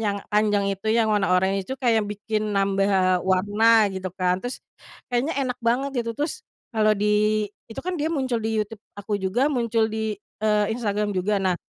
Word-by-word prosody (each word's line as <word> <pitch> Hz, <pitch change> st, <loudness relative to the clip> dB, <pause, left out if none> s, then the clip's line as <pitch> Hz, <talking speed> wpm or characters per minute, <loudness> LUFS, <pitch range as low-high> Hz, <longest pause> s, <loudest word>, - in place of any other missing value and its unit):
yang 205 Hz, -2 st, -1 dB
panjang 210 Hz, -1 st, +2 dB
itu 195 Hz, +2 st, -8 dB
yang 225 Hz, -2 st, +3 dB
warna 200 Hz, -3 st, +2 dB
oranye 190 Hz, +2 st, +2 dB
itu 265 Hz, -, -3 dB
kayak 230 Hz, -4 st, +2 dB
bikin 210 Hz, +1 st, -2 dB
nambah 195 Hz, -2 st, +2 dB
warna 205 Hz, +4 st, +4 dB
gitu 185 Hz, 0 st, -4 dB
kan 180 Hz, 0 st, +1 dB
terus, 245 Hz, +1 st, -4 dB, 0.5 s
kayaknya 250 Hz, +7 st, 0 dB
enak 250 Hz, -1 st, -3 dB
banget 250 Hz, +4 st, +1 dB
gitu 230 Hz, -, -3 dB
terus, 295 Hz, +2 st, -2 dB, 0.3 s
kalau 215 Hz, -1 st, +4 dB
di 210 Hz, -, 0 dB, 0.6 s
itu 225 Hz, -, -6 dB
kan 365 Hz, 0 st, -2 dB
dia 300 Hz, -, 0 dB
muncul 260 Hz, -6 st, 0 dB
di 220 Hz, -, 0 dB
YouTube 210 Hz, 0 st, -10 dB, 0.2 s
aku 205 Hz, +1 st, -3 dB
juga 230 Hz, +9 st, +1 dB
muncul 230 Hz, -3 st, +1 dB
di, 220 Hz, -1 st, -2 dB, 0.3 s
eee, 210 Hz, -1 st, +3 dB
Instagram 210 Hz, -3 st, -1 dB
juga 200 Hz, +2 st, +1 dB
nah, 185 Hz, -1 st, +2 dB
210 Hz, 180 wpm, -24 LUFS, 195-230 Hz, 0.6 s, warna